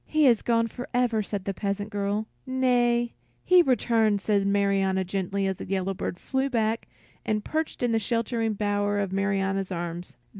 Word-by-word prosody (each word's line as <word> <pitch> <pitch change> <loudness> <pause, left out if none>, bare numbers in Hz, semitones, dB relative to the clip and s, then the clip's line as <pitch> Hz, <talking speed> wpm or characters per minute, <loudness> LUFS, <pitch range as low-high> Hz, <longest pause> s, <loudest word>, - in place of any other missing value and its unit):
"He 310 -1 +3
is 235 -5 +5
gone 230 -1 +2
forever," 245 -1 -1
said 200 -2 -4
the 195 - -1
peasant 205 +1 -3
girl. 205 +1 -1 0.2
"Nay, 245 -2 +2 0.3
he 365 -1 +6
returns," 225 - +2
said 200 -2 +2
Marianna, 195 -1 +2
gently, 195 +1 -2
as 190 -1 -1
the - - -7
yellow 195 0 0
bird 175 - -4
flew 265 0 -1
back 225 -2 0 0.4
and 215 -1 -1
perched 315 -4 -2
in 240 - +2
the 225 - +2
sheltering 230 0 -1
bower 205 0 0
of 195 -2 -2
Marianna's 195 -1 0
arms. 170 -4 -5
205 Hz, 165 wpm, -26 LUFS, 195-235 Hz, 0.4 s, he